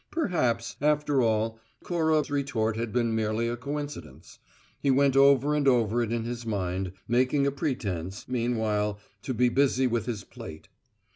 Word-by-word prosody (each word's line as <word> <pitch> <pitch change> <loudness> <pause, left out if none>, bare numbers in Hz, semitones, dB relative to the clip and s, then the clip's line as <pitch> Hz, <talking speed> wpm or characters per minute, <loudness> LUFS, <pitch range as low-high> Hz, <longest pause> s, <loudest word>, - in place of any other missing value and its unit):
Perhaps, 175 - -1
after 150 -2 +2
all, 110 -1 0 0.2
Cora's 160 -4 +1
retort 120 -6 0
had 115 0 -3
been 120 -1 +1
merely 110 +1 0
a 120 - -1
coincidence. 145 - -7 0.4
He 140 - 0
went 135 0 +4
over 140 +1 +5
and 145 -2 +1
over 120 -2 +3
it 115 -1 -2
in 115 -1 -1
his 120 +1 -5
mind, 95 -4 -2
making 130 +4 +2
a 140 - +2
pretence, 100 - -3
meanwhile, 110 -4 0 0.2
to 130 - -3
be 125 +2 +3
busy 130 0 +2
with 120 -3 0
his 115 -4 -3
plate. 80 0 -11
120 Hz, 155 wpm, -27 LUFS, 110-140 Hz, 0.4 s, over